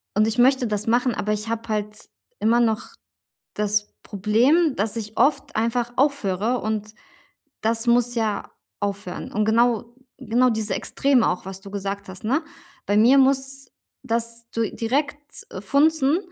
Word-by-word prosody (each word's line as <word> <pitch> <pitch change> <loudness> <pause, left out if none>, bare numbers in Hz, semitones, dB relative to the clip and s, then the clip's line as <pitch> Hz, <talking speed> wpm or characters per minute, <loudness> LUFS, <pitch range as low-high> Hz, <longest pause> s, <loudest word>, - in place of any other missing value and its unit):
Und 215 +1 +3
ich 225 +2 -2
möchte 260 +1 +4
das 210 0 -2
machen, 245 +1 +2
aber 210 +1 -1
ich 210 +1 -4
habe 230 0 -3
halt 210 0 -4 0.3
immer 230 +2 +3
noch 220 -2 0 0.7
das 210 0 0
Problem, 245 - +2
dass 210 +2 -1
ich 215 -1 -6
oft 290 - +1
einfach 235 +2 0
aufhöre, 245 -5 +1
und 215 0 -3 0.7
das 225 +1 0
muss 240 0 +3
ja 220 -3 -1 0.3
aufhören. 200 -3 -4
Und 215 - +1
genau 235 +1 +2 0.2
genau 250 0 +2
diese 220 -2 -1
Extreme 270 -4 +2
auch, 180 0 -3
was 190 0 -7
du 195 0 -11
gesagt 200 0 -5
hast, 185 0 -9
ne, 270 +9 +1 0.4
bei 205 - +1
mir 245 +6 +6
muss 270 0 +1 0.4
das 230 0 -2
du 230 -2 -1
direkt 290 +4 -3
funzen 285 - +3
230 Hz, 150 wpm, -23 LUFS, 210-255 Hz, 0.7 s, mir